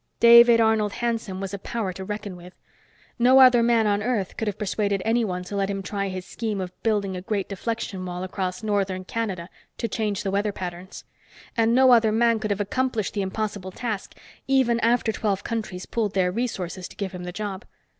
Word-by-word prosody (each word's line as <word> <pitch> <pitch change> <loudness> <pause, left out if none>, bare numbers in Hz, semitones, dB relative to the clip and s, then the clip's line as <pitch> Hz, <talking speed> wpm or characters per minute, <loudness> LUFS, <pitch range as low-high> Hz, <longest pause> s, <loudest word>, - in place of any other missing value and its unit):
David 235 0 +8
Arnold 220 -2 +2
Hanson 230 -5 -2
was 195 0 -5
a 200 - -4
power 200 -2 -3
to 190 - -7
reckon 205 -1 -5
with. 180 +1 -13 0.6
No 255 +3 +6
other 255 -2 +7
man 230 -1 +3
on 205 -1 +1
Earth 215 -5 -1
could 225 - -3
have 205 -1 -2
persuaded 205 -1 -1
anyone 220 -6 0
to 180 +3 -7
let 195 0 0
him 195 -1 -3
try 200 +1 -2
his 185 -1 -5
scheme 220 -4 -3
of 180 -1 -5
building 205 -4 0
a 180 - -5
great 200 +1 -2
deflection 200 -1 -4
wall 180 0 -5
across 185 +1 -4
northern 195 -3 -1
Canada 190 -6 -3 0.3
to 230 - -2
change 210 -2 -2
the 195 - -1
weather 205 +2 0
patterns. 180 -1 -7 0.5
And 230 0 +3
no 260 0 +6
other 225 -3 +5
man 230 0 +3
could 215 -1 -3
have 205 -1 -1
accomplished 225 +1 -1
the 205 - -1
impossible 200 -1 -3
task, 215 0 -5 0.3
even 260 -3 +3
after 235 -1 +2
twelve 205 -3 -1
countries 215 -6 -4
pooled 215 -4 -2
their 180 -2 +2
resources 185 -5 -3
to - - -15
give 195 -2 -3
him 180 -1 -7
the 180 - -5
job. 200 +1 -5
205 Hz, 200 wpm, -24 LUFS, 190-230 Hz, 0.6 s, David